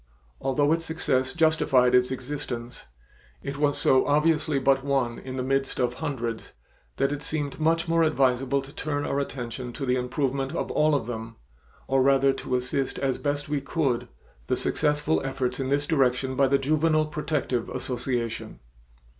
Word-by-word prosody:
Although 145 +3 +2
its 165 0 -1
success 130 -5 0
justified 155 -6 +3
its 125 0 +4
existence, 125 -2 -5 0.6
it 140 0 -4
was 145 -1 +2
so 130 0 +4
obviously 150 0 +2
but 135 0 +2
one 135 -4 0
in 130 0 -7
the 130 - -2
midst 135 +1 -1
of 125 -1 +1
hundreds 120 -7 -4 0.4
that 135 +1 +1
it 145 0 -3
seemed 145 -1 -3
much 165 +2 +2
more 165 0 +3
advisable 135 -3 +2
to 140 +1 -12
turn 145 -1 -2
our 140 - -1
attention 125 -2 -5
to 140 - -4
the 125 0 +2
improvement 135 +1 -1
of - - -2
all 155 -1 +3
of 135 - -1
them 115 -1 -6 0.5
or 135 0 +3
rather 135 0 +4
to 130 -1 -3
assist 125 +2 -1
as 135 -2 -1
best 145 0 -2
we 145 -1 -1
could, 135 -4 -1 0.4
the - - +1
successful 150 +1 0
efforts 130 -1 -2
in 135 -1 -2
this 145 +1 +1
direction 130 -3 +1
by 135 +1 +4
the 140 +1 +3
Juvenile 155 +3 +2
Protective 150 -5 -2
Association. 120 -2 -3
135 Hz, 165 wpm, -26 LUFS, 130-150 Hz, 0.6 s, its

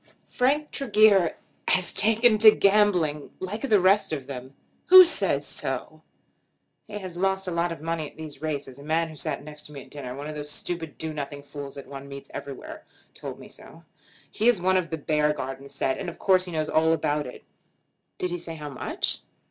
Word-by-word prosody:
Frank 290 +4 +1
Tregear 210 -8 +4 0.3
has 185 -1 +2
taken 220 +2 +4
to 220 0 +10
gambling, 195 -8 +2
like 195 +4 -5
the 210 - +5
rest 190 +1 +3
of 140 -4 -3
them." 130 0 -8 0.3
"Who 370 0 +11
says 340 - +1
so?" - - -4 0.9
"He 210 -1 -6
has 185 -4 -7
lost 190 +1 0
a - - -2
lot 170 0 0
of 165 - -7
money 165 -2 -2
at - - -24
these 155 -3 -8
races. 140 -4 -4
A - - -11
man 160 +2 0
who 155 - -10
sat 140 0 -3
next 150 0 -10
me 140 -3 -9
at 130 - -20
dinner, 130 -4 -7
one 140 +2 -7
of 155 - -5
those 150 -1 -6
stupid 160 0 -4
do 160 -1 -3
nothing 145 -1 -6
fools 140 -1 -8
that 140 - -8
one 140 0 -9
meets 140 0 -9
everywhere, 140 -2 -8 0.3
told - - -7
me - - -12
so. - - -13 0.5
He 220 - 0
is 240 -5 +5
one 185 +1 +2
of 185 -2 +1
the 160 - -3
Beargarden 145 -3 -1
set, 135 -1 -1
and 185 - -4
of 170 - -10
course 185 -1 +3
he 180 - -7
knows 155 -2 -1
all 160 +1 +3
about 150 -2 -1
it." 125 - -11 0.7
"Did 180 - -2
he 175 - -3
say 165 -1 -7
how 150 -2 -7
much?" 135 - -3
160 Hz, 205 wpm, -26 LUFS, 145-190 Hz, 0.9 s, Who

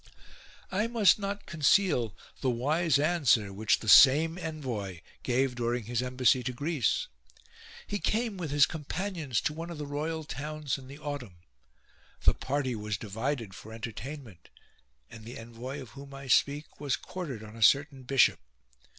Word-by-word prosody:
6. - - -23 0.6
I 205 +4 +1
must 215 -6 +4
not 200 0 -4
conceal 150 - +2 0.2
the 130 - 0
wise 145 +6 +2
answer 140 - +2
which 110 +3 +1
the 110 - -7
same 150 +8 +7
envoy 125 - -5 0.2
gave 130 +1 +1
during 120 0 -1
his 120 +2 -1
embassy 125 0 +2
to 125 +1 -3
Greece. 145 -1 0 0.8
He 205 - -3
came 225 +1 0
with 175 -5 -4
his 145 0 +5
companions 160 - -3
to 150 - -1
one 165 +2 -6
of 170 - -7
the 150 - -4
royal 155 +3 -3
towns 150 +1 -4
in 130 - -13
the 140 +2 -10
autumn; 125 - -7 0.8
the - - +5
party 135 -2 -2
was 105 -1 -3
divided 115 +1 -3
for 110 +2 -11
entertainment, 115 - -8 0.6
and 115 - -11
the 120 +3 -8
envoy 120 +4 -7
of 130 -5 -9
whom 140 +3 -11
I 135 0 -9
speak 140 +3 +1
was 140 -2 0
quartered 145 - -6
on 110 +1 -11
a 115 - -10
certain 140 +3 +4
bishop. 130 - +3
135 Hz, 160 wpm, -29 LUFS, 120-155 Hz, 0.8 s, same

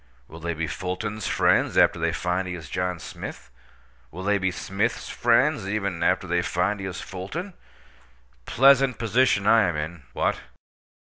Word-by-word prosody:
Will 80 - -11
they 85 0 -3
be 80 +1 -2
Fulton's 95 +4 -4
friends, - - +2
after - - +4
they - - +1
find 90 +1 -1
he 90 - -4
is 80 - -10
John 90 -1 -1
Smith? - - -9 0.6
Will 90 +7 -8
they 100 +1 +2
be 95 0 +1
Smith's 95 +2 -2
friends, 95 - +2
even, 100 -4 -2
after - - +2
they - - +1
find 95 +4 -1
he 95 - -4
is 95 -1 -6
Fulton? 140 - -6 0.9
Pleasant 135 0 +5
position 115 -2 +2
I 115 +1 +6
am 85 - -3
in! 75 +2 -5
What? - - 0
95 Hz, 165 wpm, -25 LUFS, 90-105 Hz, 0.9 s, I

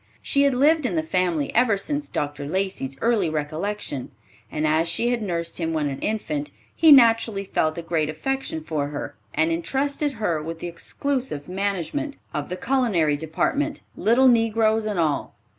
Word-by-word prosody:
She 280 - +2
had 280 -2 +3
lived 295 +2 +4
in 185 - -3
the 160 - +1
family 170 -3 0
ever 230 -3 +3
since 290 +8 -3
Dr. 145 -1 -3
Lacey's 185 -6 -2
early 225 -7 +2
recollection, 155 0 -3 0.4
and 155 0 -1
as 155 +2 +2
she 235 +8 0
had 245 -1 0
nursed 170 -4 -3
him 165 -1 -1
when 150 -2 0
an 135 - -5
infant, 155 -9 -2 0.3
he 320 -2 +6
naturally 230 -6 +5
felt 155 -4 0
a 170 - -4
great 160 -2 0
affection 215 +1 -3
for 155 -2 -2
her, 145 0 -5 0.2
and 160 +1 +2
intrusted 275 - -1
her 190 -9 -1
with 165 +2 -5
the 165 - -7
exclusive 245 - -3
management 200 - -2 0.2
of 145 -1 -3
the 180 - -4
culinary 210 - +2
department, 160 - -1
little 245 +4 +4
negroes 225 -2 +3
and 205 -4 -1
all. 155 -3 0
185 Hz, 170 wpm, -24 LUFS, 155-240 Hz, 0.4 s, he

